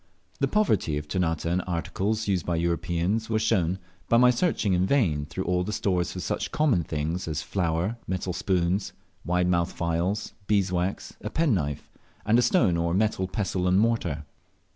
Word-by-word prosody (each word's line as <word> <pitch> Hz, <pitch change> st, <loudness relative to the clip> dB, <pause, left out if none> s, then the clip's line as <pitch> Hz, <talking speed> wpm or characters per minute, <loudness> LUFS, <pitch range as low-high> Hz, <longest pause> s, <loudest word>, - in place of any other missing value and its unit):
The -, -, +2 dB
poverty 110 Hz, -, +1 dB
of 75 Hz, 0 st, -5 dB
Ternate 80 Hz, -2 st, -1 dB
in 85 Hz, +2 st, +1 dB
articles 95 Hz, +5 st, -2 dB
used 95 Hz, -4 st, +1 dB
by 85 Hz, -, -1 dB
Europeans 85 Hz, +6 st, 0 dB
was 110 Hz, -1 st, +1 dB
shown, 95 Hz, -5 st, +2 dB, 0.3 s
by 115 Hz, -, +5 dB
my 125 Hz, +1 st, +6 dB
searching 120 Hz, -, +1 dB
in 90 Hz, +1 st, +2 dB
vain 80 Hz, -, +1 dB
through 95 Hz, +4 st, -4 dB
all 90 Hz, -1 st, +1 dB
the 105 Hz, -, -3 dB
stores 90 Hz, -5 st, 0 dB
for -, -, -6 dB
such -, -, -2 dB
common 140 Hz, -, +2 dB
things 80 Hz, +4 st, -3 dB
as 75 Hz, -1 st, -2 dB
flour, 90 Hz, +4 st, -1 dB
metal 95 Hz, 0 st, -2 dB
spoons, 90 Hz, +1 st, 0 dB, 0.3 s
wide 90 Hz, +2 st, +1 dB
mouthed 85 Hz, -1 st, +1 dB
phials, 85 Hz, +5 st, -1 dB
beeswax, 95 Hz, -2 st, 0 dB
a -, -, -3 dB
penknife, 95 Hz, -, 0 dB, 0.3 s
and 115 Hz, +3 st, +4 dB
a -, -, +5 dB
stone 120 Hz, -, +3 dB
or 85 Hz, +1 st, 0 dB
metal 100 Hz, -2 st, +1 dB
pestle 95 Hz, -3 st, -1 dB
and 90 Hz, +1 st, +4 dB
mortar. 95 Hz, -10 st, 0 dB
90 Hz, 170 wpm, -26 LUFS, 85-105 Hz, 0.3 s, my